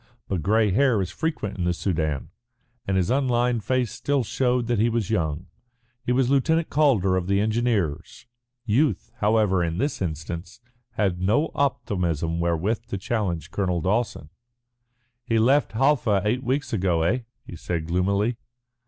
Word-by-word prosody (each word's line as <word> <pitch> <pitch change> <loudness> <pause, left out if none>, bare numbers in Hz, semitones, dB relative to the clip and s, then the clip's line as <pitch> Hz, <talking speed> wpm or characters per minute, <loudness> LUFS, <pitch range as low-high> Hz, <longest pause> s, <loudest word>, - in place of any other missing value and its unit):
But 95 -4 -2
grey 105 +3 +2
hair 125 +1 +3
is 95 -2 -2
frequent 130 - -3
in - - 0
the 85 0 +1
Soudan, 80 -6 -2 0.6
and 95 -1 +1
his 95 +4 +1
unlined 125 -3 +1
face 130 -2 0
still 140 -2 0
showed 125 +1 0
that 120 -2 0
he 115 +2 +3
was 115 -3 -1
young. 80 -6 -1 0.6
He - - -1
was 125 0 +2
Lieutenant 160 +5 +2
Calder 120 -12 +3
of 90 -1 -2
the 100 0 +2
Engineers. 110 -6 -1 0.4
Youth, 130 +7 +1
however, 105 -4 +2
in 85 0 -2
this 140 +1 -1
instance 85 +3 -5 0.3
had 95 -4 0
no 115 +12 +2
optimism 85 - -1
wherewith 85 +6 -1
to 100 - -3
challenge 95 -5 -2
Colonel 90 -3 0
Dawson. 95 -4 -1 0.9
"He 115 -1 0
left 130 +5 +3
Halfa 115 -6 +2
eight 120 +5 +1
weeks 135 +2 -1
ago, 90 -5 +1
eh?" 110 +10 +2 0.3
he - - -9
said 85 0 -3
gloomily. 100 +7 0
105 Hz, 155 wpm, -24 LUFS, 90-125 Hz, 0.9 s, hair